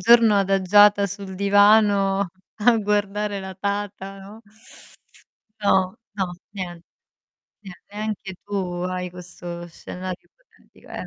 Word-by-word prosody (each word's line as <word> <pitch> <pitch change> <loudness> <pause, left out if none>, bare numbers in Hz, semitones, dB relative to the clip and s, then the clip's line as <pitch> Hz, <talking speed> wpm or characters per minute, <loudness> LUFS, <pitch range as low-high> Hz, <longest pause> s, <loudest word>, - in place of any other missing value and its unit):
giorno 230 -2 +6
adagiata 200 +1 +5
sul 195 0 -7
divano 200 0 +4 0.3
a 230 +2 +5
guardare 205 -1 -1
la 190 0 -7
tata, 200 0 -4
no? 200 +3 -12 1.2
No, 190 -2 +2 0.2
no, 190 -3 -1 0.2
nie 175 -3 -6 0.8
nie 190 - -8 0.2
neanche 210 -2 -5
tu 180 -3 -3
hai 180 0 -3
questo 175 -1 -8
scenario 180 +2 -8
ipotetico, - - -24
eh - - -6
195 Hz, 110 wpm, -23 LUFS, 185-205 Hz, 1.2 s, giorno